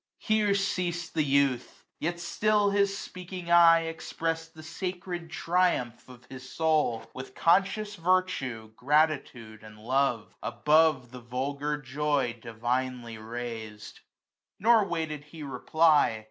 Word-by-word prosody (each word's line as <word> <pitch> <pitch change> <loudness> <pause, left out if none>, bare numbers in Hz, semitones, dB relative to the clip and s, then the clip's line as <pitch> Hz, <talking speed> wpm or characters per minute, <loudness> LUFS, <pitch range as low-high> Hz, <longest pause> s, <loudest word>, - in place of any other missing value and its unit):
H£R£ 215 -2 +2
ceasM 175 -3 -2
the 155 - +1
youth: 140 -3 0
yet 170 +2 -2
still 205 +3 +1
his 200 0 +1
speaking 180 -2 -7
eye 165 -1 +7
Expressed 165 0 -4
the 155 - -11
sacred 180 0 -5
triumph 165 -10 0
of 125 -1 -14
his 130 0 -11
soul, 155 -8 +1
29^; - - -16
With 130 0 -9
conscious 195 +5 +2
virtue, 165 -11 0
gratitude, 135 -6 0
and 110 0 -13
love. 125 0 -1
Above 150 +1 +2
the 125 0 -10
vulgar 140 +5 -3
joy 145 -2 -1
divinely 120 0 -3
raised. 110 -2 -7 0.6
Nor 225 0 +4
waited 160 -5 -4
he 155 +1 -10
reply. 145 -1 +2
150 Hz, 120 wpm, -28 LUFS, 125-175 Hz, 0.6 s, eye